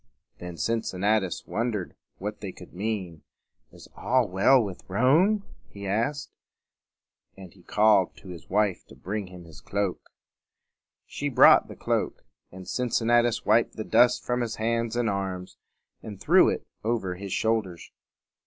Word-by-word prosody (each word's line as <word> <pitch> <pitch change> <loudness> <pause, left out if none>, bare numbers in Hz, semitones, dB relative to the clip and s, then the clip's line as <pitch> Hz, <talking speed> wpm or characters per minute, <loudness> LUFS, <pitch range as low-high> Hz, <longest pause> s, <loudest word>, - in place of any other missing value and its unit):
Then 90 -1 -8
Cincinnatus 105 -2 -1
wondered 110 -5 -3 0.2
what 105 +2 -6
they 100 - -5
could 90 - -14
mean. 95 -4 -4 0.5
"Is - - -14
all 125 -1 +1
well 100 +8 +4
with 100 -6 -4
Rome?" 160 - +3 0.3
he 100 0 -9
asked; 115 +9 -2 1.1
and 95 -2 -12
he 95 - -20
called 105 -1 +3
to 95 - -13
his 85 -3 -10
wife 100 -1 +1
to - - -15
bring 100 +1 -5
him 90 -1 -12
his 80 -3 -14
cloak. 100 +3 -3 1.0
She - - -4
brought - - +6
the - - -10
cloak; - - -2 0.3
and 95 0 -11
Cincinnatus 120 -1 +1
wiped 115 - +3
the 110 - -4
dust 120 +3 +3
from 125 0 -1
his 115 -2 -3
hands 115 +1 -1
and 120 -1 0
arms, 95 -2 -4 0.4
and 105 -3 -9
threw - - +5
it - - -3 0.2
over 110 -5 -1
his 95 +1 -8
shoulders. 105 -7 -1
105 Hz, 145 wpm, -26 LUFS, 95-115 Hz, 1.1 s, brought